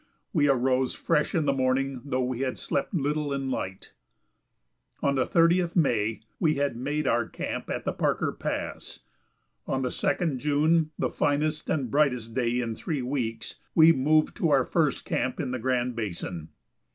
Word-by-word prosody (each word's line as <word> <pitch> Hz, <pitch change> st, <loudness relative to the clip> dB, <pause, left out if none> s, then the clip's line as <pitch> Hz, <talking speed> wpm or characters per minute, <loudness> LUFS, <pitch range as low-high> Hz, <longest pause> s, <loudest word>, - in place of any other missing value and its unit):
We 145 Hz, -5 st, +3 dB
arose 130 Hz, 0 st, +2 dB
fresh 150 Hz, -, 0 dB
in 160 Hz, -3 st, +2 dB
the 140 Hz, -, +2 dB
morning 130 Hz, 0 st, 0 dB
though 130 Hz, -2 st, -1 dB
we 125 Hz, -1 st, -2 dB
had 130 Hz, -1 st, -2 dB
slept -, -, -2 dB
little 150 Hz, -3 st, -1 dB
and 135 Hz, -1 st, -2 dB
light. 95 Hz, -5 st, -5 dB, 1.1 s
On 140 Hz, -, +3 dB
the 130 Hz, -2 st, +1 dB
30th 170 Hz, +1 st, +3 dB
May 115 Hz, -, +1 dB, 0.2 s
we 155 Hz, -2 st, +2 dB
had 140 Hz, -2 st, 0 dB
made 145 Hz, +5 st, -2 dB
our 120 Hz, -3 st, +1 dB
camp -, -, -5 dB
at -, -, -3 dB
the -, -, 0 dB
Parker -, -, 0 dB
Pass; -, -, -5 dB, 0.7 s
on 130 Hz, 0 st, -1 dB
the 125 Hz, -, 0 dB
2d 175 Hz, -6 st, 0 dB
June, 150 Hz, +4 st, +2 dB
the -, -, -1 dB
finest 150 Hz, +2 st, 0 dB
and 135 Hz, -7 st, -1 dB
brightest 125 Hz, -6 st, +1 dB
day 120 Hz, 0 st, 0 dB
in 115 Hz, -2 st, -2 dB
three 140 Hz, +3 st, -3 dB
weeks, 125 Hz, -3 st, -3 dB, 0.2 s
we 160 Hz, 0 st, +8 dB
moved 155 Hz, +1 st, +2 dB
to 165 Hz, -, +1 dB
our 140 Hz, -3 st, +4 dB
first 155 Hz, -5 st, 0 dB
camp 130 Hz, -, -1 dB
in -, -, -2 dB
the 130 Hz, -, -2 dB
Grand 125 Hz, 0 st, 0 dB
Basin. 90 Hz, -6 st, -4 dB
135 Hz, 170 wpm, -27 LUFS, 125-150 Hz, 1.1 s, we